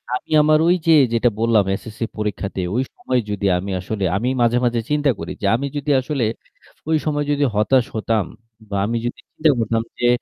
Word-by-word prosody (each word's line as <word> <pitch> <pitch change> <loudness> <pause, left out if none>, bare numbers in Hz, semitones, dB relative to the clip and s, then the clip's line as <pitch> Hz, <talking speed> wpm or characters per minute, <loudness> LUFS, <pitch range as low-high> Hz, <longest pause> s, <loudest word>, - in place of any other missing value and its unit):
আমি - - -7
আমার 155 +1 +4
ওই 175 - +5
যে - - +6 0.2
যেটা 120 +1 +3
বললাম 115 -3 +3 0.2
SSC 110 -1 -12 0.2
পরীক্ষাতে 100 -3 -3
ওই 125 - +2
সময় 125 -1 -1
যদি 100 -1 -3
আমি 95 +2 -4
আসলে 100 +2 -4
আমি 120 +6 0
মাঝে, 120 +1 +3
মাঝে 120 -1 +1
চিন্তা 145 -1 +2
করি 80 - -5
যে - - -2
আমি 140 +4 -2
যদি 145 +1 -4
আসলে 135 -1 -2 0.7
ওই 160 - +3
সময় 145 -1 0
যদি 145 0 +1
হতাশ 120 +4 +3
হতাম 110 -2 0 0.4
বা 100 - -3
আমি 115 +2 -1
যদি 120 - -4
চিন্তা 155 0 +1
করতাম 115 0 0 0.2
যে 120 - +2
120 Hz, 195 wpm, -20 LUFS, 105-140 Hz, 0.7 s, যে